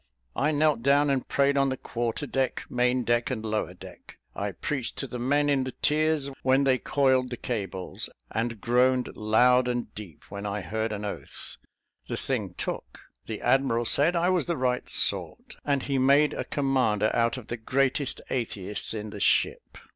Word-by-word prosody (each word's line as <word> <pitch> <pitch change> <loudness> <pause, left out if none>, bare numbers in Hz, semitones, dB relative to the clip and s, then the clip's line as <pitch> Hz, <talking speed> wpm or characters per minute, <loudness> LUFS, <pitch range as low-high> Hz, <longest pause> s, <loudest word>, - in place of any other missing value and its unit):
I 150 - +2
knelt 150 -3 +2
down 140 +2 +4
and 135 -2 -1
prayed 140 0 +2
on 135 0 +3
the 130 - -2
quarter 120 +3 -3
deck, 135 -1 -1
main 125 0 +2
deck, 120 0 +1
and 110 -4 -3
lower 110 0 -2
deck. - - -13 0.2
I - - -3
preached 135 -5 -3
to - - -2
the 125 -2 -6
men 145 +4 +2
in 140 -2 +2
the 130 -1 -5
tiers, 155 -2 +1
when 130 +1 +3
they 130 -2 +3
coiled 130 -2 +2
the 125 - -5
cables, 95 -7 -3 0.2
and 115 0 -2
groaned 125 +3 +2
loud 125 +4 +4
and 120 -1 -2
deep 100 -8 -10
when 100 0 -6
I 105 0 -3
heard 110 +6 -2
an 105 0 -4
oath. 100 - -6 0.5
The - - -2
thing - - -2
took - - -5 0.3
the 110 -2 -5
admiral 120 -2 +2
said 150 +9 +4
I 170 +1 +2
was 180 -2 +1
the 170 -2 -1
right 125 -1 -1
sort, - - -1
and 140 -2 0
he 135 -2 0
made 140 +3 +4
a - - -3
commander 125 -7 +1
out 115 +2 +2
of 125 - -10
the 120 - -3
greatest 135 +3 0
atheist 105 -4 -3
in 105 -1 -5
the 105 - -7
ship. - - +1
125 Hz, 185 wpm, -27 LUFS, 115-140 Hz, 0.5 s, down